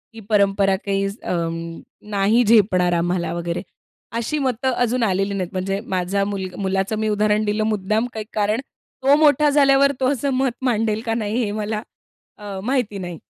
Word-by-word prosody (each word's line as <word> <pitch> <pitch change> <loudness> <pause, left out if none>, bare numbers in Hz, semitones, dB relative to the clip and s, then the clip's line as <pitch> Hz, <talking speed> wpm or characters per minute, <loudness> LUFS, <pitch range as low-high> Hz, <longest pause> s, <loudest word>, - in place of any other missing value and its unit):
ही - - -8
परंपरा 195 -2 +3
काही 195 0 0 0.2
अ, - - -2 0.8
नाही 205 +5 +3
झेपणार 190 -5 +4
आम्हाला 175 0 0
वगैरे 170 0 -3 0.6
अशी 235 +7 -1
मतं 260 +1 0
अजून 245 0 0
आलेली 195 0 0
नाहीत. 185 -3 -2
म्हणजे 195 +1 -2
माझा 190 +2 0
मुलग 190 -3 -4
मुलाचं 195 +2 -1
मी 220 0 0
उदाहरण 210 0 +2
दिलं 210 +1 0
मुद्दाम 215 +2 0
काही 220 -1 -5
कारण 215 +2 +1 0.4
तो 275 +2 +6
मोठा 300 -1 +4
झाल्यावर 280 -1 +4
तो 260 +1 +2
असं 280 +1 -2
मत 260 0 +1
मांडेल 220 -3 +1
का 225 - 0
नाही 225 +2 -1
हे 205 - -2
मला 215 0 -3 0.6
अ, 200 -2 -7
माहिती 245 -4 -1
नाही. 175 -3 -6
210 Hz, 165 wpm, -21 LUFS, 195-235 Hz, 0.8 s, तो